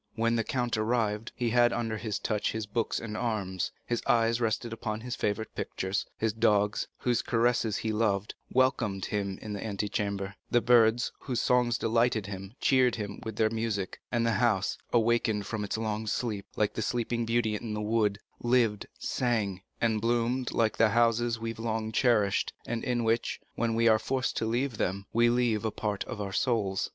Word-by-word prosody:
When 115 +1 +1
the 115 - +1
count 120 -1 -1
arrived, 110 -1 0
he 120 -2 -1
had 120 0 +5
under 115 -2 -1
his 110 -1 -3
touch 105 -1 -1
his 110 -1 -3
books 110 +2 -1
and 110 -2 -6
arms, 105 -6 -2
his 120 - -1
eyes 115 -2 +3
rested 115 +1 -1
upon 110 -1 -4
his 125 +1 -4
favorite 105 +2 -2
pictures; 95 +1 -2
his 110 -2 0
dogs, 105 -2 +2
whose 120 -1 +1
caresses 115 -2 +1
he 110 - -2
loved, 105 -2 0 0.2
welcomed 120 -7 +1
him 100 -2 -2
in 105 - -5
the 100 - -4
antechamber; 100 -1 -2 0.2
the 120 - +4
birds, 120 -1 +4
whose 125 -3 -2
songs 125 -2 +2
delighted 115 -2 +1
him, 95 +2 -7
cheered 130 -2 +4
him 100 -3 -5
with 110 -1 -5
their 110 0 +2
music; 110 -4 -2
and 120 -1 +1
the 115 - +3
house, 105 -5 +2 0.2
awakened 115 -3 +2
from 105 +1 -3
its 105 - -2
long 110 0 -2
sleep, 105 -3 -2
like 105 -1 +1
the - - -3
sleeping 120 +1 -1
beauty 115 -1 +1
in 105 0 -4
the - - -3
wood, 105 -1 +1 0.2
lived, 120 -4 +2
sang, 110 -7 -1 0.2
and 110 -2 +1
bloomed 120 +2 0
like 110 -2 +1
the 115 -1 +5
houses 115 +1 +2
we 115 0 -3
have 115 - -11
long 110 -1 -2
cherished, 110 -4 +2
and 115 -1 -3
in 120 -1 0
which, 115 +1 0
when 115 -1 0
we 115 0 +3
are 110 -1 +5
forced 130 +1 -1
to 110 - -1
leave 120 +1 -1
them, 100 +2 -1
we 120 +1 +4
leave 120 -3 +1
a 110 - +1
part 105 -1 -2
of - - -6
our 100 -2 -4
souls. 100 -4 0
115 Hz, 190 wpm, -29 LUFS, 105-120 Hz, 0.2 s, had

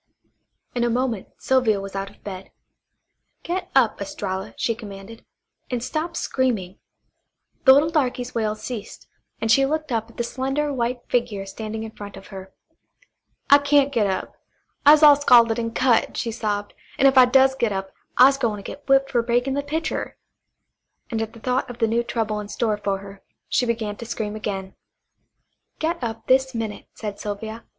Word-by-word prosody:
In 240 - 0
a 240 - +2
moment 240 -4 -1
Sylvia 250 -6 +2
was 195 0 -7
out 195 0 -3
of - - -22
bed. 190 -2 -7 0.9
"Get 365 +2 -3
up, 240 -6 +3
Estralla," 195 0 -4
she 230 - 0
commanded, 215 -1 -10 0.5
"and 245 -2 -2
stop 325 +5 -3
screaming." 215 -8 -1 0.9
The 265 - +10
little 295 +4 +4
darky's 255 -5 -1
wails 215 -2 -2
ceased, 230 -5 -7 0.3
and 225 - 0
she 270 +3 +5
looked 310 +1 -1
up 225 -1 -1
at - - -18
the 235 - 0
slender 270 +4 -2
white 245 -1 -1
figure 230 -5 -1
standing 220 +2 -6
in 220 - -7
front 205 -2 -10
of 195 - -13
her. 190 -1 -9 1.0
"I 285 - +9
kyan't 285 -1 +3
git 220 -5 +2
up; 190 - -3 0.5
I'se 305 +1 +8
all 295 -1 +9
scalded 235 -5 +5
and 230 -1 -3
cut," 255 -3 +2
she 230 - -2
sobbed, 210 -2 -3 0.2
"an' 275 - +3
if 270 0 +6
I 255 -1 +9
does 265 +1 +5
get 235 -4 0
up 195 0 -4 0.3
I'se 270 +2 +6
gwine 220 -5 0
to 200 - -9
get 285 +6 -10
whipped 270 0 +4
for 240 -3 +2
breaking 245 +3 0
the 285 - 0
pitcher," 310 +3 -3 0.9
and 225 -1 -1
at 225 0 -4
the 230 - -13
thought 250 +3 -1
of 245 -1 -9
new 230 0 +2
trouble 225 -3 -2
in 210 - -6
store 215 0 -1
for 200 -1 -1
her, 195 0 -12 0.3
she 245 - +1
began 220 -3 -2
to 235 - -8
scream 215 -2 -3
again. 195 -3 -4 1.0
"Get 325 -2 -2
up 225 -1 -4
this 265 0 +3
minute," 220 -2 -4
said 210 -2 -6
Sylvia. 220 +2 -6
235 Hz, 180 wpm, -23 LUFS, 210-265 Hz, 1.0 s, The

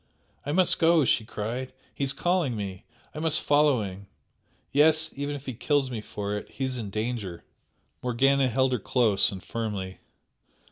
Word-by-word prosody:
"I - - 0
must 180 +3 +3
go!" 165 -3 +5
she 110 - +2
cried 120 +4 -4 0.2
"He - - -3
is 135 - +2
calling 170 -3 0
me! 95 -3 -5 0.3
I 155 - -6
must 160 -1 +2
follow 145 -5 +3
him 95 0 -8 0.6
yes, 155 +2 +3
even 145 +1 -3
if 140 -1 -9
he 130 - -4
kills 135 +2 0
me 115 -3 -4
for 105 -1 -4
it - - -14
he 135 - -5
is 130 -1 -2
in 105 -3 -5
danger!" 105 -4 -4 0.6
Morgana 130 +2 +3
held 130 +2 +2
her 125 - 0
close 110 -2 +2
and 95 -2 -8
firmly. 100 -5 -4
125 Hz, 175 wpm, -27 LUFS, 105-145 Hz, 0.6 s, go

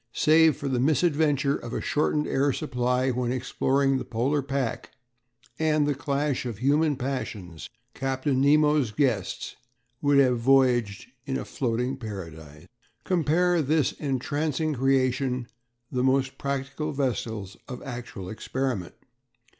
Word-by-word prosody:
Save 160 -1 +4
for 140 - -4
the 130 -2 0
misadventure 145 -1 +2
of 120 0 -7
a - - -1
shortened 150 0 0
air 140 +1 +1
supply 125 -2 0
when 125 0 -1
exploring 135 +2 +1
the - - -4
Polar 125 +5 0
pack, 135 -3 -3 0.7
and 155 -2 +2
the 145 - +1
clash 140 0 -1
of 120 -5 -5
human 145 +5 +2
passions, 110 - -5 0.2
Captain 135 0 -1
Nemo's 150 -2 +4
guests 110 -4 -1 0.4
would 145 -1 +3
have 130 -3 +4
voyaged 120 -5 +3 0.2
in 135 -1 -1
a - - -5
floating 125 +1 -2
paradise. 80 - -8 0.4
Compare 175 +1 +2
with 155 -5 0
this 155 -1 +2
entrancing 150 +2 -1
creation 130 -1 +1 0.5
the 125 -1 0
most 135 0 +1
practical 140 +2 -3
vessels 115 -7 -2
of 125 -2 -7
actual 120 -7 -7
experiment. 110 -2 -3
135 Hz, 130 wpm, -26 LUFS, 125-145 Hz, 0.7 s, Save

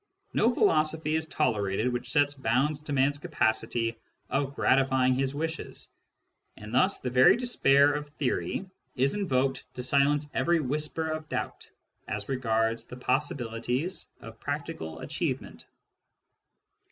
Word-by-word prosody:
No 230 +3 +3
philosophy 155 -6 +2
is 160 0 -1
tolerated 110 -5 0
which 120 +1 -4
sets 145 0 +3
bounds 135 +3 0
to 150 - -8
man's 140 +1 +2
capacity 115 -6 0 0.3
of 135 +1 -1
gratify 130 -1 +3
ing 130 - +4
his 135 +1 0
wishes; 160 +2 -5 0.7
and 105 +2 -9
thus 185 +10 +3
the 125 - -4
very 130 - +6
despair 145 - +4
of 145 0 -4
theory 150 +7 -2 0.3
is 135 +2 +2
invoked 135 -9 0
to 125 - -4
silence 140 +3 +3
every 165 +6 +2
whisper 150 +3 0
of 155 0 -5
doubt - - -4 0.4
as - - -3
regards 115 -3 0
the 125 - -10
possibilities 125 +3 -1
of - - -11
practical 80 0 -5
achievement. - - -4
135 Hz, 130 wpm, -28 LUFS, 125-150 Hz, 0.7 s, very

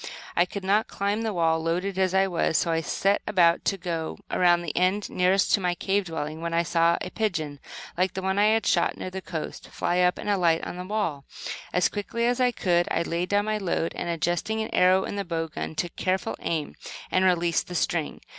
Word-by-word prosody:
I 175 - +4
could 195 +2 -7
not 205 +3 +2
climb 200 +2 -1
the 225 -1 -1
wall, 165 -3 +2
loaded 180 +4 -1
as 190 0 +2
I 190 0 +5
was, 170 -3 +1
so 170 - +1
I 165 0 +1
set 195 +6 +1
about 175 -4 +3
to 195 - +1
go 170 -3 -4
around 175 -1 +3
the 165 - -5
end 185 +3 +1
nearest 185 +2 +2
to - - +5
my 180 -2 0
cave 195 +2 0
dwelling; 160 -1 -5
when 170 0 -2
I 170 - +3
saw 170 0 +2
a 180 - -5
pigeon, 160 -10 -2 0.4
like 185 +1 0
one 190 +1 0
I 210 - +5
had 220 +1 +2
shot 170 - +2
near 185 - -5
the 190 +1 -5
coast, 160 -4 -6
fly 175 - -1
up 180 0 +3
and - - -7
alight 175 -5 +2
on - - -6
the 180 - -5
wall. 185 -9 -2 0.5
As 180 - +3
quickly 220 +3 -3
as 245 +1 +1
I 250 - +5
could 175 -7 +1
I - - +1
laid 170 +2 -2
down 205 0 +2
my 215 0 -1
load, 170 -3 -1
and, 175 - -4
adjusting 175 +6 -1
an 220 - -3
arrow 185 +1 +4
in 205 - -4
the 200 - -1
bow 165 -2 -3
gun, 155 - -5
took 170 +2 -3
careful 185 0 -1
aim 160 -3 -2 0.4
and 185 - +3
released 175 -2 +2
the 180 - -7
string. 165 -1 -1
180 Hz, 225 wpm, -26 LUFS, 170-195 Hz, 0.5 s, I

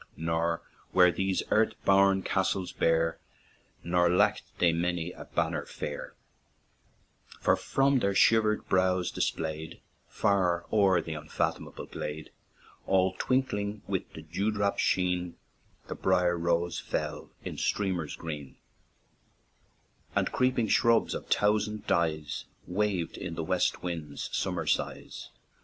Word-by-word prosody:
Nor 80 +1 -1 0.3
were 90 -1 +6
these 95 +2 0
earth 110 +1 +3
born 95 -1 +5
castles 95 -1 0
bare, 80 -1 +1 0.6
Nor 85 0 +3
lacked 90 +4 +1
they 85 -2 +3
many 85 0 -1
a - - -10
banner - - -1
fair; 75 - -6 1.2
For, - - +3
from 135 0 +2
their 100 -3 0
shivered 110 0 +4
brows 95 -1 +2
displayed, 80 0 -3 0.3
Far 90 -4 +1
o'er 100 -4 +4
the 80 - -5
unfathomable 75 - -3
glade, 75 +1 -6 0.6
All 95 -1 +3
twinkling 105 -5 0
with 95 -1 -3
the 80 - -9
dew 90 +7 -1
drop 100 -2 0
sheen, 90 -1 +1 0.5
The - - -5
brier 90 -2 +2
rose 85 0 0
fell - - -4 0.2
in - - -5
streamers 90 -7 -1
green; 75 -5 -7 1.6
And - - +1
creeping 125 -3 +1
shrubs, 115 -1 +3
of - - -5
thousand 105 +1 +1
dyes, 80 -3 0 0.2
Waved 95 -2 -1
in - - -5
the - - -3
west - - 0
wind's 80 -5 -4
summer - - -1
sighs. - - -2
90 Hz, 120 wpm, -29 LUFS, 85-100 Hz, 1.6 s, were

